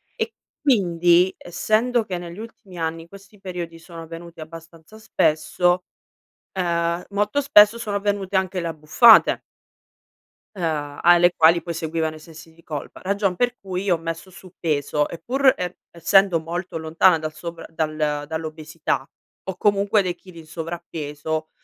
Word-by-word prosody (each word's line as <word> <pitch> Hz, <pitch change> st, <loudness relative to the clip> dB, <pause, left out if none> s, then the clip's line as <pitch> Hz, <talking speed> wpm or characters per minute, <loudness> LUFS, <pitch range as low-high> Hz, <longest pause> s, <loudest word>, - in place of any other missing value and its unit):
E 455 Hz, -1 st, -3 dB, 0.3 s
quindi, 180 Hz, -, +3 dB
essendo 220 Hz, +6 st, 0 dB
che 180 Hz, -3 st, -4 dB
negli 175 Hz, +1 st, -9 dB
ultimi 215 Hz, -4 st, -11 dB
anni 165 Hz, 0 st, -3 dB
questi 200 Hz, +2 st, -16 dB
periodi 175 Hz, -3 st, -6 dB
sono 165 Hz, 0 st, -10 dB
venuti 165 Hz, 0 st, -10 dB
abbastanza 165 Hz, +5 st, -12 dB
spesso, 175 Hz, -2 st, +1 dB, 0.7 s
ehm, 170 Hz, -1 st, -1 dB
molto 205 Hz, +7 st, 0 dB
spesso 220 Hz, -5 st, +6 dB
sono 210 Hz, -3 st, -2 dB
venute 200 Hz, -1 st, -2 dB
anche 185 Hz, -1 st, 0 dB
le 170 Hz, -, -4 dB
abbuffate 165 Hz, +9 st, +5 dB, 1.1 s
ehm, 150 Hz, -5 st, -3 dB
alle 175 Hz, 0 st, +6 dB
quali 165 Hz, +1 st, +5 dB
poi 170 Hz, -, -5 dB
seguivano 160 Hz, 0 st, -2 dB
i -, -, -11 dB
sensi 160 Hz, +1 st, -14 dB
di 170 Hz, -, -21 dB
colpa, 150 Hz, -4 st, -7 dB
ragion 195 Hz, -1 st, 0 dB
per 245 Hz, 0 st, +1 dB
cui 190 Hz, 0 st, -4 dB
ho 175 Hz, -, +3 dB
messo 165 Hz, +3 st, -6 dB
su 185 Hz, 0 st, -15 dB
peso, 150 Hz, -2 st, 0 dB
e 170 Hz, -, -8 dB
pur 265 Hz, +1 st, +3 dB
e 180 Hz, 0 st, -4 dB
essendo 175 Hz, +1 st, +3 dB
molto 175 Hz, +1 st, -5 dB
lontana 165 Hz, +2 st, +3 dB
dal 155 Hz, 0 st, -5 dB
sovra 170 Hz, +1 st, -8 dB
dal 155 Hz, -2 st, -2 dB
dall'obesità, 155 Hz, -2 st, -4 dB, 0.3 s
ho 190 Hz, -2 st, -5 dB
comunque 205 Hz, 0 st, +2 dB
dei 180 Hz, -2 st, -2 dB
chili 180 Hz, -1 st, -14 dB
in 160 Hz, -, -12 dB
sovrappeso, 160 Hz, -2 st, -5 dB
170 Hz, 145 wpm, -22 LUFS, 160-195 Hz, 1.1 s, spesso